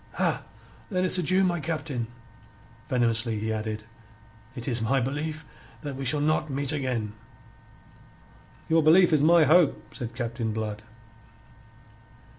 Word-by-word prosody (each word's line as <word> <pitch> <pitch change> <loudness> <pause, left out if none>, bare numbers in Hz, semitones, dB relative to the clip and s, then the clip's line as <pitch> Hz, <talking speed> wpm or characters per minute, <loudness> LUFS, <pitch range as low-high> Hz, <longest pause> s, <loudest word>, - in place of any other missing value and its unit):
"Ha! - - 0 0.5
Then 185 -3 0
it's 185 0 +4
adieu, 185 +3 +3
my 175 -2 +1
Captain." 150 -6 -3 0.8
Venomously 115 -3 +1
he 110 +1 -2
added: 110 0 -4 0.7
"It 120 -3 -7
is 120 -3 0
my 135 +5 +2
belief 150 +5 -3 0.4
that 145 -3 -5
we 135 0 -5
shall 145 +4 +2
not 155 +1 +1
meet 140 0 -1
again." 125 -7 -2 1.5
"Your 165 0 +4
belief 170 +3 +6
is 150 - +4
my 165 +2 +6
hope," 155 +1 +3
said 120 -1 -6
Captain 115 -2 -3
Blood. 105 -1 -4
135 Hz, 130 wpm, -26 LUFS, 115-155 Hz, 1.5 s, belief